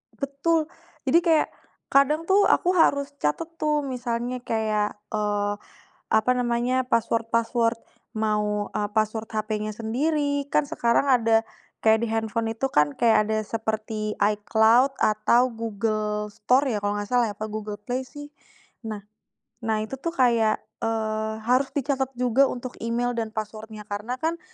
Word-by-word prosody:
Betul, 305 +4 0 0.3
jadi 335 - +4
kayak, 330 -3 +3 0.4
kadang 295 +4 +4
tuh 400 +1 +5
aku 360 - +3
harus 280 -4 +3
catet 150 - -1
tuh 300 -1 +1
misalnya 245 -1 -3
kayak, 215 -2 0 0.2
eee, 205 -1 0 0.6
apa 220 +3 +3
namanya, 245 +1 +1
password 230 -1 +1
password 230 0 +1 0.4
mau, 210 -1 0
e - - -2
password 220 0 -1
hp-nya 215 -1 -2
sendiri, 285 +6 -1
kan 290 - +2
sekarang 275 -3 +1
ada 230 -3 +3 0.3
kayak 220 0 +3
di 235 - 0
handphone 225 0 -1
itu 225 +4 -1
kan 150 - +2
kayak 220 -2 +3
ada 220 - +1
seperti 220 -1 -3
icloud 220 +5 +4
atau 215 +4 +3
google 215 -1 -2
store 255 +6 +2
ya, 205 - -2
kalau 205 0 -1
nggak 205 - -3
salah 240 -1 +2
ya 205 - -7
,apa 215 - -3
google 215 -1 -5
play 245 +5 -3
sih. 290 +3 -10 0.6
Nah 210 -2 -6 0.5
nah 225 -1 0
itu 265 +4 -7
tuh 335 - -2
kayak, 235 -5 +3 0.2
eee, 220 -1 -1
harus 255 +3 +2
dicatat 270 -1 0
juga 250 +2 +3
untuk 250 0 -5
email 240 +1 -1
dan 230 -2 -2
password-nya. 215 0 -7
Karena 210 +4 -4
kan, 330 +5 -2
230 Hz, 145 wpm, -25 LUFS, 215-260 Hz, 0.6 s, tuh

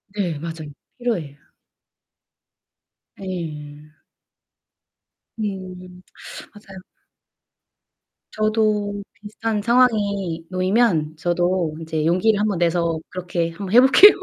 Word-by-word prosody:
네 180 -7 -1
맞아요. 160 -2 -6 0.3
필요해요. 175 - -2 1.8
네. 150 -5 -7 1.5
음. 185 -3 -6 0.5
맞아요. 195 -2 -12 1.6
저도 215 -2 0
비슷한 210 +2 -4
상황이 205 -7 +2
놓이면 185 -5 +1
저도 175 0 0
이제 160 -1 -2
용기를 200 +6 +3
한번 210 -3 0
내서 170 -1 +1
그렇게 175 -2 -2
한번 185 +3 -6
해 - - +10
볼게요. 270 +10 +9
185 Hz, 185 characters per minute, -22 LUFS, 165-210 Hz, 1.8 s, 해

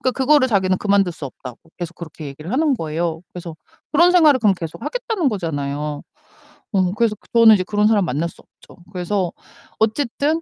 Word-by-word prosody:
그러니까 255 - 0
그거를 270 0 +3
자기는 190 -3 +1
그만둘 200 -3 +2
수 160 - -9
없다고 125 -2 -10 0.2
계속 175 0 -5
그렇게 155 -3 -9
얘기를 150 - -8
하는 295 0 +2
거예요. 165 -2 -3
그래서 170 -2 -8 0.4
그런 345 +4 +5
생활을 310 -7 +6
그럼 205 -4 +4
계속 165 -2 -8
하겠다는 450 - -1
거잖아요. 150 - -3 0.7
어 185 -2 +2
그래서 230 -2 +1 0.2
저는 230 -2 +8
이제 185 - 0
그런 210 +2 +1
사람을 205 -4 +3
만날 155 +4 -2
수 - - -18
없죠. 175 - -20
그래서 180 0 -1 0.5
어쨌든 285 +7 0
195 Hz, 425 characters per minute, -20 LUFS, 165-255 Hz, 0.7 s, 저는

